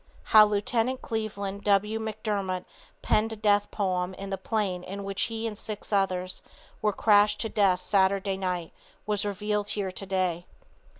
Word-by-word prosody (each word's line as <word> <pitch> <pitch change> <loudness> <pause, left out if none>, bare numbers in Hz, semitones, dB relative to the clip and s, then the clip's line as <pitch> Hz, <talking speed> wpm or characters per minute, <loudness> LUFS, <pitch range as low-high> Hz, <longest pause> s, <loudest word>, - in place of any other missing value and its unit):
How 215 -1 +8
Lieut. 225 +5 0
Cleveland 200 -3 -4
W. 210 +2 +2
McDermott 210 -4 -3 0.4
penned 220 +1 +2
a - - -5
death 205 -1 +2
poem 185 -2 -1
in 195 +1 -7
the - - +1
plane 200 -5 -1
in 200 +2 -6
which 195 0 -3
he 225 0 -4
and 220 -2 -3
six 210 0 -6
others 185 -2 0 0.4
were 210 - +2
crashed 210 0 +4
to 225 - -1
death 190 -4 +2
Saturday 195 0 +2
night 180 -3 -3 0.3
was 210 -1 0
revealed 205 0 -1
here 195 -3 -1
today. 185 -2 -2
200 Hz, 155 wpm, -27 LUFS, 190-215 Hz, 0.4 s, How